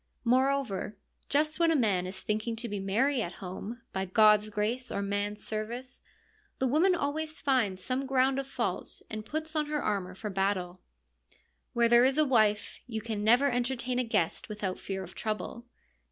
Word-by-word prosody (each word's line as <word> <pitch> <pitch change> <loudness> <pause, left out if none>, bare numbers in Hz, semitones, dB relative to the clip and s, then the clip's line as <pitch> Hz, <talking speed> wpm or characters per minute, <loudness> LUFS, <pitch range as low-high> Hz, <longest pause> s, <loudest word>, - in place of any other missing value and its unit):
Moreover, 255 -5 +1 0.3
just 305 +2 +2
when 335 -1 +4
a 325 - +3
man 200 -9 +2
is 190 +1 -8
thinking 215 +2 -1
to 235 +1 -3
be 205 -2 -3
merry 230 +8 +1
at 175 -4 -3
home 200 +6 -7
— - - -45
by 190 0 -1
God's 210 +2 +5
grace 220 +5 -1
or 200 - -1
man's 205 +1 -2
service 235 +4 -5 0.3
— 430 -2 -37
the 265 - 0
woman 325 +9 +4
always 310 +1 -2
finds 220 -9 +1
some 260 +6 -2
ground 265 0 +2
of 275 - -4
fault 275 - -3
and 215 0 -4
puts 315 +6 -5
on 305 -1 +1
her 300 0 -1
armour 190 -3 -1
for 210 +2 -5
battle. 185 -2 -1 0.9
Where 235 0 +4
there 240 +1 +6
is 265 +2 +3
a 310 - +5
wife, 215 -6 +2
you 220 -3 -3
can 215 -1 -4
never 245 +6 +5
entertain 245 0 0
a - - +2
guest 225 -7 -1
without 205 -3 -3
fear 190 -1 -4
of 185 - -11
trouble. 220 +2 -4
230 Hz, 185 wpm, -30 LUFS, 205-270 Hz, 0.9 s, there